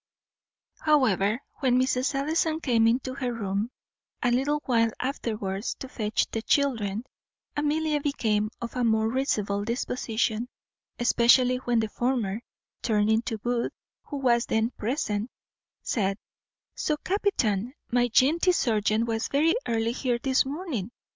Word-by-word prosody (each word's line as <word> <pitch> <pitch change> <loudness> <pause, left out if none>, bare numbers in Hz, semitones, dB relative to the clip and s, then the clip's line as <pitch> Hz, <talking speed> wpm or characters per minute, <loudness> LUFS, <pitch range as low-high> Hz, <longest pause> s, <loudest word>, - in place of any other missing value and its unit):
However, 230 - +3 0.2
when 255 -2 +3
Mrs. 260 +1 +1
Ellison 315 +3 +1
came 230 -7 +3
into 255 +3 +1
her 255 -2 -2
room 205 -1 -2 0.5
a 245 - +3
little 275 +5 +1
while 230 -3 +3
afterwards 215 -6 -3
to 265 - -8
fetch 215 -4 0
the 225 - -2
children, 225 -5 +1 0.5
Amelia 300 0 0
became 215 -7 0
of 235 +1 -6
a 250 - 0
more 220 -1 +3
risible 210 -6 0
disposition, 230 0 -1 0.5
especially 245 +1 +4
when 245 -2 +1
the 220 - -1
former, 235 -3 -1 0.4
turning 220 0 +2
to 230 -2 -3
Booth, 240 +2 -1 0.3
who 290 - -5
was 240 -3 +2
then 220 +2 +1
present, 220 -2 -2 0.5
said, 195 -3 0 0.6
"So, 305 - -1
captain, 260 - 0 0.2
my 245 0 +3
jantee 310 - +4
serjeant 220 -5 +1
was 225 -1 -1
very 310 +4 +3
early 230 0 +1
here 245 -1 -1
this 265 +1 +1
morning. 280 - -4
240 Hz, 130 wpm, -27 LUFS, 220-270 Hz, 0.6 s, especially